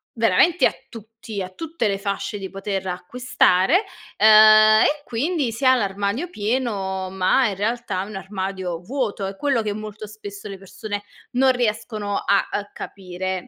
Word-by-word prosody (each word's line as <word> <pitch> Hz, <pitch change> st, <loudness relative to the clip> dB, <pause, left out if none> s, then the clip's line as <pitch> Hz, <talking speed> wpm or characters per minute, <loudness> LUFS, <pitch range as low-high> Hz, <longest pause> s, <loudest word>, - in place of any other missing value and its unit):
veramente 230 Hz, -, +4 dB
a -, -, -4 dB, 0.2 s
tutti 225 Hz, -2 st, -8 dB
a 185 Hz, -, -5 dB
tutte 315 Hz, -, -3 dB
le 200 Hz, -, 0 dB
fasce 200 Hz, +1 st, -3 dB
di 195 Hz, -1 st, -6 dB
poter 195 Hz, -1 st, -4 dB
acquistare, 190 Hz, -, +2 dB, 0.4 s
uhm 215 Hz, -, +6 dB, 0.6 s
e 295 Hz, 0 st, 0 dB
quindi 280 Hz, +2 st, -1 dB
si 245 Hz, +4 st, -4 dB
ha 260 Hz, -, +7 dB
l'armadio 205 Hz, -, -2 dB
pieno 205 Hz, -, -2 dB
ma 190 Hz, +7 st, +2 dB
in 200 Hz, -, -3 dB
realtà 205 Hz, -2 st, -2 dB
è -, -, -7 dB
un 210 Hz, -1 st, -9 dB
armadio 190 Hz, -2 st, -4 dB
vuoto. 225 Hz, -2 st, -3 dB
È 195 Hz, -, -6 dB
quello 275 Hz, -3 st, +1 dB
che 210 Hz, -1 st, -2 dB
molto 215 Hz, 0 st, -7 dB
spesso 205 Hz, -1 st, -9 dB
le 195 Hz, -, -7 dB
persone 205 Hz, +2 st, -6 dB, 0.3 s
non 260 Hz, +1 st, +4 dB
riescono 215 Hz, -4 st, -2 dB
a, 200 Hz, 0 st, +1 dB
uhm, 205 Hz, 0 st, -3 dB
capire. 185 Hz, -1 st, -5 dB
205 Hz, 160 wpm, -22 LUFS, 195-240 Hz, 0.6 s, ha